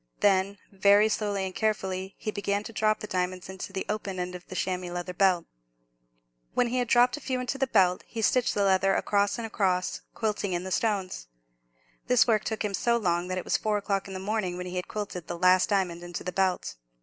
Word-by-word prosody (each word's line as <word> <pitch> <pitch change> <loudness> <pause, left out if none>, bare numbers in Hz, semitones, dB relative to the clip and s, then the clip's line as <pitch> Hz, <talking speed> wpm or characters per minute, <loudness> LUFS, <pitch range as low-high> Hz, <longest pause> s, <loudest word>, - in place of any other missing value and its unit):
Then, 200 0 +3
very 200 +2 +5
slowly 205 -2 -1
and 190 - -5
carefully, 190 -3 -2
he 215 - -3
began 200 0 -1
to 230 - -9
drop 215 0 +1
the - - -4
diamonds 185 -1 -2
into 190 +1 -7
the 190 0 -3
open 205 -3 -3
end 180 0 -3
of 180 0 -9
the 185 - -8
chamois 185 -1 -2
leather 175 +1 -4
belt. 180 -2 +3 1.1
When 245 - +2
he 250 +1 0
had 245 - 0
dropped 245 +3 +4
a - - -10
few 260 -1 -2
into 250 +2 -3
the 270 - +2
belt, 185 -6 +3
he 225 -1 -4
stitched 250 +2 +2
the 205 - +2
leather 195 0 +3
across 200 +1 +1
and 230 - -4
across, 185 -4 0
quilting 210 -3 -1
in 175 0 -1
the 190 - -6
stones. 190 - -1 0.8
This 250 -2 +5
work 220 -3 +2
took 220 -1 -2
him 205 - -2
so 235 +4 +2
long, 175 -5 0
that 185 0 -2
it 185 - -2
was - - +2
four 215 -1 0
o'clock 200 -1 -1
in 190 - -7
the - - -4
morning 190 -2 -2
when 180 - -5
he 180 0 -5
had 180 - -3
quilted 200 -5 -5
the 175 - -4
last 185 +1 +4
diamond 185 -4 0
into 175 -1 -6
the 180 - -3
belt. 185 - 0
195 Hz, 225 wpm, -28 LUFS, 185-215 Hz, 1.1 s, very